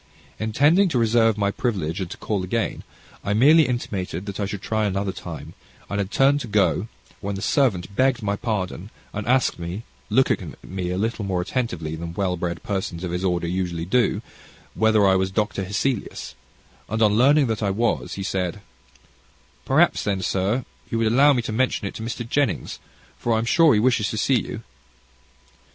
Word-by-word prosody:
Intending 145 - +3
to 135 - 0
reserve 115 -1 +3
my 100 -1 +1
privilege, 95 -7 -2
and 90 - -3
to - - -8
call 100 -4 -2
again, 110 +5 -2 0.4
I 100 - 0
merely 150 +7 +6
intimated 100 -7 -3
that 100 -1 -6
I 100 - -1
should 100 -1 -6
try 110 -1 0
another 100 0 -1
time, - - -8 0.4
and 100 - -1
had 100 -2 -1
turned 140 +5 +3
to 120 - -5
go, 105 0 +2 0.3
when 100 0 -3
the 95 - -5
servant 100 -9 +1
begged 130 -1 +2
my 100 0 0
pardon, 100 -3 -3 0.2
and 105 +1 -4
asked 130 -6 +2
me, 85 +6 -5 0.3
looking 130 +5 +1
at - - -20
me 90 -1 -3
a 90 - -2
little 110 +2 -1
more 95 -2 -1
attentively 90 -6 -2
than 85 +1 -6
well 95 -2 0
bred 85 0 -4
persons 95 -3 -3
of 90 - -3
his 90 +1 -2
order 90 -2 0
usually 85 -2 -2
do, 120 +7 +1 0.5
whether 110 -2 +3
I 95 -1 +5
was 95 0 +1
Dr. 100 0 -1
Hesselius; 105 +5 -2 0.6
and, 110 - -1
on 105 -1 +4
learning 140 +6 +5
that 110 -3 -2
I 100 - +1
was, 115 +5 -1
he 95 - -4
said, 95 0 -2 1.1
"Perhaps - - +3
then, 95 -2 -1
sir, 100 +8 0 0.2
you 115 - -1
would 115 -1 +2
allow 140 +4 +6
me 125 -4 +1
to 115 - -4
mention 120 -1 0
it - - -6
to - - -7
Mr. 115 +1 -4
Jennings, 140 -3 -1 0.4
for 120 - 0
I - - +3
am 115 - 0
sure 160 +1 +5
he - - +3
wishes 115 -2 +2
to 110 - -4
see 125 +2 +2
you." - - -7
105 Hz, 195 wpm, -23 LUFS, 95-120 Hz, 1.1 s, merely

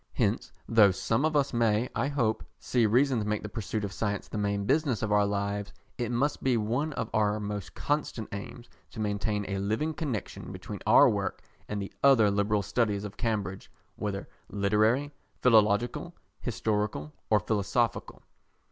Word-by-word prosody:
Hence - - 0 0.2
though 110 -3 +6
some 115 +8 0
of 155 -1 0
us 140 -2 +2
may, 115 0 +2
I 120 +4 0
hope, 120 -7 0
see 120 -3 +1
reason 125 +3 +3
to 105 - -3
make 105 0 -1
the 105 - -5
pursuit 105 -1 -3
of 95 - -6
science 105 -1 -2
the - - -9
main 100 -1 0
business 135 -2 +1
of 110 - -1
our 105 -1 +4
lives, 100 0 -2 0.3
it 120 -1 -1
must 135 +5 0
be 130 -3 +2
one 120 +8 -1
of 115 - -4
our 105 0 +2
most 105 -2 -5
constant 145 -7 -2
aims 105 +4 -7 0.2
to - - -10
maintain 105 0 -1
a 100 0 -2
living 110 +11 -1
connexion 145 - -4
between - - -7
our - - +8
work - - -1 0.3
and 105 - -2
the 100 - -6
other 120 -7 +6
liberal 105 +1 +1
studies 105 0 0
of 105 0 -7
Cambridge, 105 -5 -2 0.3
whether 100 -2 -4 0.2
literary, 110 +8 +2 0.3
philological, 115 +7 +3 0.2
historical 105 - -2 0.2
or 105 - +5
philosophical. 110 +4 -1
110 Hz, 165 wpm, -29 LUFS, 100-120 Hz, 0.3 s, our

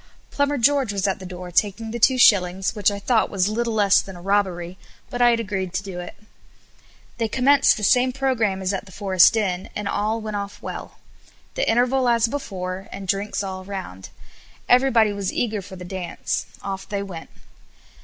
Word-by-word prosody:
Plumber 285 0 0
George 270 -2 +2
was 200 0 -1
at 195 - -1
the 190 - -8
door 180 0 -8
taking 210 +5 0
the 235 - -4
two 255 +3 +4
shillings, 190 -5 +4
which 210 -3 +2
I 200 - -4
thought 220 +3 +1
was 190 -2 +1
little 230 +1 -1
less 200 -2 +4
than 195 - -10
a - - -10
robbery, 185 -2 -1 0.3
but 245 - -3
I 240 - +7
had 235 -1 +2
agreed 195 -5 -3
to 195 - -1
do 190 -3 -7
it. 175 - -8 1.0
They 225 - +1
commenced 270 +5 +4
the 210 - -6
same 250 +4 +4
programme 240 -8 0
as 190 +1 0
at 195 +1 -4
the - - -13
Forest 190 +2 +4
Inn, 185 -4 -1
and 210 -1 -3
all 215 +3 -1
went 215 -1 -5
off 200 0 -6
well. - - -8 0.6
The - - 0
interval 250 +2 +2
as 235 -1 +3
before, 195 -8 -5
and 195 -1 -7
drinks 200 +2 -1
all 190 -1 -5
round. 185 - -7 0.6
Everybody 245 -4 +4
was 200 -2 -3
eager 220 -4 -1
for 190 0 -11
the 180 -1 -9
dance; 180 -1 -4 0.2
off 195 -1 -5
they 200 -1 -2
went. 180 -5 -9
200 Hz, 195 wpm, -22 LUFS, 190-230 Hz, 1.0 s, I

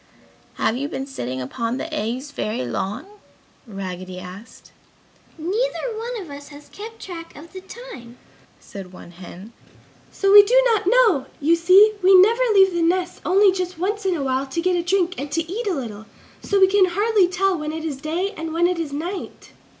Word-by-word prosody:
"Have 225 - 0
you 280 +2 -3
been 270 - -4
sitting 130 - -5
upon 230 - -3
the 320 +3 -6
eggs 260 +1 -3
very 215 - -3
long?" 195 - -4 0.6
Raggedy 185 -3 -7
asked. 185 +5 -12 0.7
"Neither 450 +7 -2
one 465 +2 -5
of 355 -7 -9
us 285 0 -10
has 290 0 -14
kept 445 +2 -10
track 335 -3 -9
of 330 +5 -13
the 375 - -8
time," 380 - -11 0.4
said 195 -2 -10
one 175 - -12
hen. 185 +5 -12 0.6
"So 395 0 +1
we 410 0 +11
do 480 +5 +3
not 405 -4 -1
know! 435 - +3
You 320 +4 +3
see, 375 +6 +6
we 375 0 +7
never 450 +6 +4
leave 385 -1 +5
the 345 - -1
nests 360 +2 0
only 390 +2 +4
just 365 -2 -4
once 410 +5 -2
in 380 -2 0
a 295 - -3
while 265 0 -1
to 270 +5 -4
get 365 +1 +1
a 350 - +1
drink 360 0 0
and 285 +1 -5
to 330 +2 0
eat 425 +6 -4
a 380 - 0
little. 220 -5 -7 0.3
So 400 - 0
we 380 - +8
can 385 0 +4
hardly 405 +2 +2
tell 370 +1 0
when 305 -2 -4
it 320 0 -6
is 295 -4 -4
day 350 +7 -2
and 320 0 -5
when 340 +1 +2
it 355 -1 0
is 320 -3 -4
night." 345 +7 -6
335 Hz, 195 wpm, -21 LUFS, 265-390 Hz, 0.7 s, we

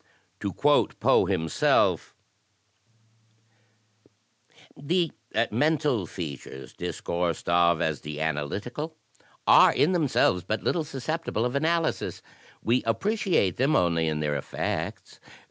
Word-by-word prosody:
To - - -3
quote - - +2
Poe - - +4
himself: 80 -1 +1 2.6
"The 170 +3 0 0.4
mental 145 - +1
features 70 -6 -8
discoursed 85 -2 -3
of 85 -1 +3
as 80 -2 -2
the 75 0 -6
analytical 100 - -3 0.5
are, - - +7
in 155 - +2
themselves, 145 - +2
but 110 - -3
little 170 - 0
susceptible 150 -3 -3
of 125 - -2
analysis. 160 +3 -1 0.4
We 120 +3 +2
appre 115 - 0
ciate 180 - +1
them 135 +5 +2
only 85 -2 +2
in 75 -1 -1
their 75 -1 -1
effects. 70 - -4
110 Hz, 110 wpm, -26 LUFS, -, 2.6 s, are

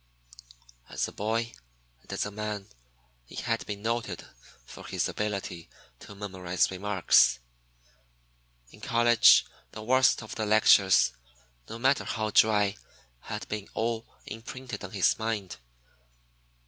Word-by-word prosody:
As - - -2
a - - -9
boy 115 +3 -2 0.5
and - - -14
as - - -2
a 100 - -5
man, 105 -1 -5 0.6
he - - -13
had 115 0 -2
been 100 0 -6
noted 115 +1 -3 0.4
for - - -12
his - - -1
ability 100 -5 -4 0.3
to 100 - -12
memorize 95 -3 -1
remarks. 95 0 +3 1.3
In - - -17
college 120 0 +5 0.3
the 110 - -8
worst 130 0 +3
of 110 - -8
the 110 -2 -3
lectures, 100 -7 +5 0.6
no 115 - -6
matter 135 +5 +2
how 110 -1 -2
dry, 105 -1 +3 0.4
had 105 - -7
been 105 -1 -5
all 115 0 -2 0.2
imprinted 125 +3 -8
on 95 - -6
his 95 -1 +1
mind. 110 -4 -3
105 Hz, 125 wpm, -28 LUFS, 100-115 Hz, 1.3 s, college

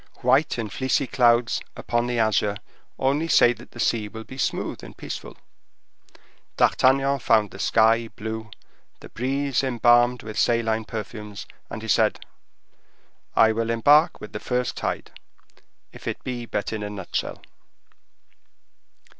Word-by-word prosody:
White 130 +5 +3
and 110 -4 -4
fleecy 130 +1 0
clouds 120 -2 +3 0.2
upon 120 0 -1
the 120 -1 -2
azure 105 -2 +2 0.4
only 140 +5 +1
say 120 -6 +5
that 120 +1 -15
the 120 - -13
sea 110 -3 +1
will 110 +2 -9
be 130 - -11
smooth 135 - -2
and - - -11
peaceful. - - -7 1.2
D'Artagnan 135 +1 +3
found 110 -4 +2
the 95 - -11
sky 115 +2 +3
blue, 110 0 -6 0.5
the - - -11
breeze 135 +2 -1
embalmed 120 -1 +3
with 110 -1 -5
saline 115 -2 +1
perfumes, 105 -1 -7 0.2
and - - -7
he - - -6
said: - - +2 1.2
"I 110 - +6
will 115 +1 -2
embark 145 +8 +4
with 105 - -10
the 105 - -4
first 125 +1 -2
tide, - - -4 0.8
if - - -12
it - - -4
be 120 -2 -5
but 105 0 -3
in 110 - -3
a 105 - -4
nutshell." 100 -3 -4
115 Hz, 140 wpm, -24 LUFS, 110-125 Hz, 1.2 s, I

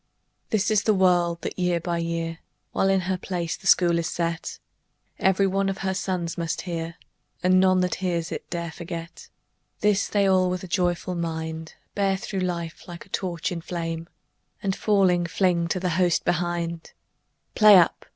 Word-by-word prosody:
This 210 -1 +1
is 210 -2 +4
the 215 0 +2
word 175 -2 +3
that - - -5
year 180 -1 +1
by 170 0 -2
year, 165 0 -3 0.3
While 195 - +1
in 195 -1 +3
her 185 0 -2
place 175 -3 -3
the 190 - -8
School 170 -2 +5
is 165 - -2
set, 170 -1 -3 0.6
Every 190 +1 +3
one 195 +1 +1
of 195 - -3
her 190 - +1
sons 180 -3 -2
must 165 -1 -2
hear, 165 -2 -4 0.5
And 185 +1 +5
none 185 0 +4
that 180 - 0
hears 170 -3 -1
it - - -6
dare 170 -1 -3
forget. 170 0 -8 0.5
This 210 -1 +2
they 200 -1 +2
all 185 -1 +3
with 180 0 -3
a - - -6
joyful 180 0 0
mind 160 -1 -4 0.2
Bear 195 -1 +1
through 195 -1 -4
life 170 -2 -4
like 170 -1 -9
a - - -23
torch 175 -3 -2
in 170 -2 -4
flame, 165 -1 -4 0.5
And 195 -1 0
falling, 185 -4 +2
fling 175 -1 +1
to 185 - -1
the 180 0 -1
host 175 0 +1
behind 175 -1 -2 0.6
"Play 210 -2 +8
up! 175 -2 +2
175 Hz, 180 wpm, -25 LUFS, 170-190 Hz, 0.6 s, Play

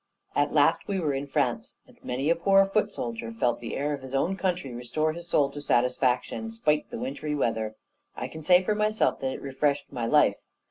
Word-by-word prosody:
At - - +2
last, - - +3
we 195 -2 -1
were 155 -5 0
in 135 +1 -3
France; - - -1
and - - -20
many 135 +5 0
a - - +4
poor 195 +3 +4
foot 210 +1 0
soldier 115 - -5
felt 120 +1 0
the 115 - -5
air 145 +2 -1
of 140 - -5
his 130 0 -6
own 170 +8 +1
country 180 -9 -2
restore 155 +6 -1
his 170 +1 -8
soul 145 -4 +2
to 145 - -7
satisfaction, 125 - +1
spite 155 -10 0
of - - -38
the 235 - -6
wintry 230 - -3
weather. 110 -5 -1 0.4
I - - -3
can 160 - -9
say 180 +4 +5
for 210 - +1
myself 215 +1 +1
that 130 - -2
it - - -7
refreshed 140 +1 -1
my 120 -3 -2
life. - - +4
145 Hz, 220 wpm, -27 LUFS, 125-185 Hz, 0.4 s, say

